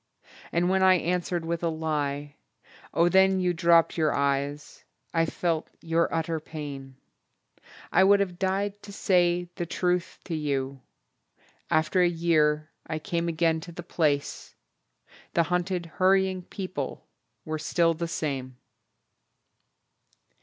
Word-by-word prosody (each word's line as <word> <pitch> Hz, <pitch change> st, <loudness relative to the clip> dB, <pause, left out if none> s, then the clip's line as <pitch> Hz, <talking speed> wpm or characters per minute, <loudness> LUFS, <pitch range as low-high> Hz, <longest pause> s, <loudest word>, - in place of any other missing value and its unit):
And 170 Hz, +1 st, +1 dB
when 190 Hz, +1 st, +2 dB
I 190 Hz, 0 st, +6 dB
answered 175 Hz, -1 st, -1 dB
with 170 Hz, 0 st, -2 dB
a 170 Hz, -, +1 dB
lie. 145 Hz, -2 st, -2 dB, 0.6 s
Oh 170 Hz, +1 st, +3 dB
then 190 Hz, +1 st, +4 dB
You 180 Hz, -1 st, +1 dB
dropped 170 Hz, 0 st, +4 dB
your 155 Hz, -2 st, +2 dB
eyes. 140 Hz, +1 st, -2 dB, 0.3 s
I 165 Hz, -1 st, +2 dB
felt 165 Hz, -1 st, -1 dB
your 165 Hz, 0 st, 0 dB
utter 165 Hz, 0 st, -1 dB
pain. 140 Hz, -4 st, -8 dB, 1.0 s
I -, -, +5 dB
would 200 Hz, +1 st, +6 dB
have 180 Hz, -3 st, -2 dB
died 200 Hz, +2 st, -1 dB
to 205 Hz, -, -10 dB
say 175 Hz, -2 st, +2 dB
the 175 Hz, -, -3 dB
truth 180 Hz, +1 st, -1 dB
to 175 Hz, -, -5 dB
you. 140 Hz, -3 st, -2 dB, 0.9 s
After 160 Hz, +4 st, +2 dB
a 175 Hz, -, +5 dB
year 155 Hz, -2 st, +1 dB, 0.2 s
I 155 Hz, -, -2 dB
came 170 Hz, +2 st, -2 dB
again 165 Hz, -1 st, +1 dB
to 170 Hz, +2 st, -9 dB
the 175 Hz, +1 st, -8 dB
place 150 Hz, -4 st, -1 dB, 0.8 s
The 170 Hz, -, +5 dB
hunted 180 Hz, +1 st, -1 dB
hurrying 190 Hz, +2 st, +2 dB
people 185 Hz, -8 st, -5 dB, 0.4 s
were 155 Hz, 0 st, -3 dB
still 165 Hz, +1 st, +2 dB
the 170 Hz, +1 st, -3 dB
same.... 135 Hz, -6 st, -4 dB
170 Hz, 130 wpm, -27 LUFS, 155-180 Hz, 1.0 s, I